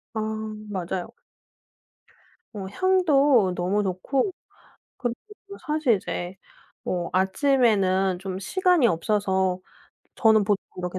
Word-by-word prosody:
아 220 Hz, -, -1 dB, 0.5 s
맞아요. 185 Hz, -2 st, -4 dB, 1.4 s
어 200 Hz, -3 st, -6 dB
향도 290 Hz, -, +3 dB
너무 185 Hz, +4 st, 0 dB
좋고 200 Hz, -, -1 dB, 0.7 s
그리고 240 Hz, -2 st, -2 dB, 0.3 s
또 400 Hz, -, -9 dB
사실 300 Hz, -6 st, +2 dB
이제 180 Hz, -1 st, -5 dB, 0.5 s
어 175 Hz, -2 st, -2 dB
아침에는 195 Hz, -3 st, +2 dB
좀 190 Hz, 0 st, -5 dB
시간이 360 Hz, -, +2 dB
없어서 190 Hz, 0 st, 0 dB, 0.6 s
저는 220 Hz, -2 st, +4 dB
보통 200 Hz, 0 st, 0 dB
이렇게 180 Hz, 0 st, -4 dB
200 Hz, 210 characters per minute, -25 LUFS, 185-270 Hz, 1.4 s, 저는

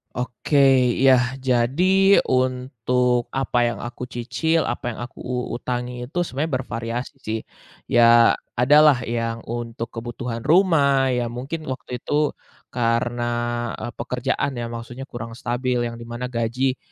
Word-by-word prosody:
Oke. 125 Hz, +4 st, -2 dB, 0.4 s
Yah, 130 Hz, -2 st, +6 dB, 0.2 s
jadi 170 Hz, +11 st, +4 dB
untuk 125 Hz, -1 st, +1 dB
apa 135 Hz, -2 st, -1 dB
yang 120 Hz, -3 st, -2 dB
aku 120 Hz, +1 st, -6 dB
cicil, 130 Hz, +8 st, -1 dB
apa 120 Hz, -1 st, -3 dB
yang -, -, -10 dB
aku 120 Hz, -, -8 dB
u 125 Hz, -1 st, -3 dB
utangi 125 Hz, 0 st, -4 dB
itu 160 Hz, +8 st, -9 dB
sebenarnya 155 Hz, -1 st, -2 dB
bervariasi 120 Hz, 0 st, -5 dB
sih. 110 Hz, +1 st, -3 dB, 0.5 s
Ya, 115 Hz, 0 st, +6 dB, 0.2 s
ada 125 Hz, +5 st, +4 dB
lah 150 Hz, -4 st, +6 dB
yang 115 Hz, -1 st, -3 dB
untuk 115 Hz, -1 st, -4 dB
kebutuhan 115 Hz, 0 st, -6 dB
rumah. 145 Hz, -7 st, +4 dB
Ya 125 Hz, -1 st, 0 dB
mungkin 155 Hz, +5 st, -5 dB
waktu 130 Hz, -1 st, -5 dB
itu 150 Hz, +3 st, 0 dB, 0.4 s
karena, 120 Hz, 0 st, 0 dB, 0.6 s
eee, -, -, -4 dB
pekerjaan 125 Hz, +3 st, -1 dB
ya, 120 Hz, -2 st, -4 dB
maksudnya 120 Hz, +3 st, -7 dB
kurang 115 Hz, -1 st, -7 dB
stabil 125 Hz, +1 st, -1 dB
yang 115 Hz, -1 st, -3 dB
di 115 Hz, -, -9 dB
mana 120 Hz, +2 st, -5 dB
gaji 125 Hz, +2 st, -1 dB
125 Hz, 140 wpm, -22 LUFS, 120-130 Hz, 0.6 s, Yah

